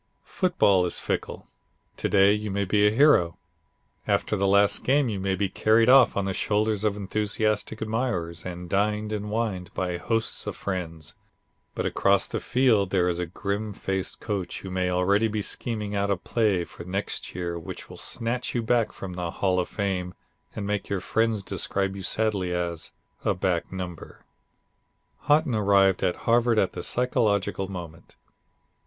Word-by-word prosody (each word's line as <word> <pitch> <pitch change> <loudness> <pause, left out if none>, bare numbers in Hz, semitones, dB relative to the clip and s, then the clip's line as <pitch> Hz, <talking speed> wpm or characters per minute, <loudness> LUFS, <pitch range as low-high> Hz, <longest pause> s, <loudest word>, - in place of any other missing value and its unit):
Football 105 - +2
is - - +2
fickle. - - -3 0.5
To - - -1
day 100 0 +5
you 105 0 -2
may 100 +1 -1
be 105 +2 +3
a - - +6
hero. 110 - +4 0.7
After - - +1
the 100 -1 +1
last 100 +1 +3
game 140 -1 +3
you 100 -3 -3
may 95 0 0
be 100 +2 0
carried 110 +5 +3
off 130 -5 +6
on 100 - 0
the 95 - -1
shoulders 105 +1 0
of 105 -2 +1
enthusiastic 105 +2 -1
admirers 110 -7 -2
and 90 -1 -6
dined 105 +3 0
and 105 0 -3
wined 105 -5 -2
by 90 -2 -1
hosts 115 +5 -2
of - - -3
friends; 85 -5 -5 0.6
but - - -2
across - - +2
the - - -3
field 115 -7 +2
there 90 -2 +2
is 90 -1 -1
a 90 - -2
grim 100 +4 -3
faced 95 -1 -3
coach 100 -4 -4
who 95 - -7
may 90 0 0
already 100 +5 +2
be 105 -1 -2
scheming 105 -3 -3
out 100 0 0
a 100 - +1
play 100 -2 +1
for - - -11
next 95 +1 -3
year 85 -1 -3
which 80 - -8
will - - -11
snatch 120 +2 -3
you 120 - 0
back 115 -1 +2
from 95 -2 -7
the 90 -1 -3
"Hall 90 +1 0
of 90 - -2
Fame" 95 -3 -2 0.4
and 105 - -4
make 105 0 -2
your 100 - 0
friends 110 0 0
describe 95 +1 -1
you 100 - -6
sadly 100 -2 -1
as 85 -2 -3 0.3
a - - +1
"back 90 -2 -1
number." 90 -3 -7 1.0
Haughton 150 -3 +3
arrived 100 -3 +3
at 90 -2 +1
Harvard 120 0 +3
at 95 - +2
the - - -6
psychological 100 -6 0
moment. 85 -3 -9
100 Hz, 175 wpm, -26 LUFS, 90-110 Hz, 1.0 s, a